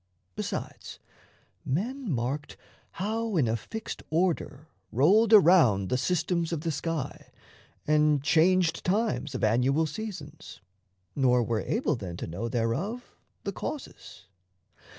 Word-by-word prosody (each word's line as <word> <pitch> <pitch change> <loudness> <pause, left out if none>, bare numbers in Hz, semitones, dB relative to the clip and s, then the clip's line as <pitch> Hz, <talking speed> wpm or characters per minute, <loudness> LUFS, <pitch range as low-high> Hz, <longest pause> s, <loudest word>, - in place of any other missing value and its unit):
Besides, - - -5 0.7
men 235 - -2
marked 135 +4 -3 0.4
How 220 +1 -2
in 135 -7 +3
a 110 - +1
fixed 220 - -6
order 160 -3 -1 0.2
rolled 200 - +4
around 160 - +6
The - - +1
systems 170 +2 0
of 165 -3 -2
the 165 0 -1
sky, 155 0 -4 0.5
and 150 -2 +3
changed 170 +3 +3
times 195 - 0
Of - - -4
annual 125 +8 +2
seasons, 160 -5 -7 0.6
nor 125 -3 +3
were 115 -1 -1
able 220 - 0
then 90 -7 -7
To - - -5
know 100 +8 -4
thereof 145 - -2 0.3
the - - -2
causes. 180 - -7
155 Hz, 120 wpm, -28 LUFS, 125-185 Hz, 0.7 s, around